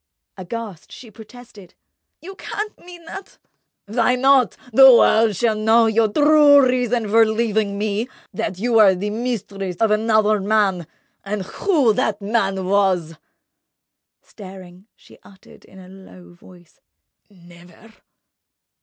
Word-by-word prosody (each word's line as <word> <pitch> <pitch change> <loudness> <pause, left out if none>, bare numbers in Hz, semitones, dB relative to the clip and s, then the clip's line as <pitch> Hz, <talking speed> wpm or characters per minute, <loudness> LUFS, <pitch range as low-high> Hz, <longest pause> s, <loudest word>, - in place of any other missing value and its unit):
Aghast, 200 -1 -9
she 230 -4 -13
protested: 220 -3 -16 0.5
"You 380 +3 -10
can't 420 +2 -7
mean 350 -1 -15
that!" 390 +4 -11 0.5
"Why 230 +3 0
not? 265 -1 +2 0.2
The 265 +2 +8
world 225 -3 +3
shall 225 +3 0
know 220 +2 +2
your 220 -1 0
true 290 0 +4
reason 245 -3 -1
for 225 +2 +4
leaving 220 -2 -2
me—that 210 -2 -5
you 235 +5 -3
were 210 -4 +5
the 205 +3 -5
mistress 210 -5 -5
of 220 +3 0
another 215 -1 +1
man—and 200 0 -3
who 280 - 0
that 210 0 -2
man 200 -3 -2
was!" 185 -4 -1 1.1
Staring, 190 -1 -14
she - - -21
uttered 195 -1 -20
in 190 - -19
a 185 -1 -14
low 185 -2 -16
voice: 175 -1 -21 0.5
"Never!" 175 +3 -19
215 Hz, 120 wpm, -19 LUFS, 190-235 Hz, 1.1 s, The